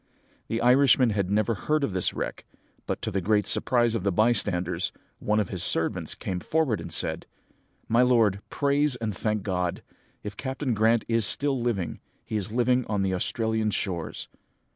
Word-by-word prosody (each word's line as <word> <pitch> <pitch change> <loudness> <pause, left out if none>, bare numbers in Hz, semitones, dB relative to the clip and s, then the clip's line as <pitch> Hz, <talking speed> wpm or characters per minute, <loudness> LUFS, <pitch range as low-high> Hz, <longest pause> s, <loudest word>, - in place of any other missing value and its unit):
"The 115 +1 -2
Irishman 125 -1 +5
had 100 -3 -1
never 105 +2 +1
heard 150 +8 -1
of 110 - -1
this 95 -1 +1
wreck; - - -5 0.4
but, - - -3
to - - -2
the 95 - -1
great 105 +2 +2
surprise 120 -3 +2
of 115 - -1
the 100 +1 0
bystanders, 90 -4 +1 0.3
one 105 +1 +1
of 105 - -1
his 90 -3 -3
servants 80 - +1
came 90 -1 -4
forward 130 - 0
and - - -8
said, - - -2 0.6
"'My 115 +2 +3
lord, 115 -6 +3
praise 145 -1 +1
and 110 -4 -4
thank 105 +1 -2
God! 90 -3 -2 0.4
If 105 0 -6
Captain 130 -1 -2
Grant 110 +2 +2
is 115 -3 +3
still 140 -2 +1
living, 115 -7 -2 0.3
he - - -5
is 105 0 -1
living 125 +2 +2
on 100 -2 -1
the 95 -1 0
Australian 110 +3 -1
shores.' 90 -5 -3
110 Hz, 175 wpm, -26 LUFS, 95-120 Hz, 0.6 s, Irishman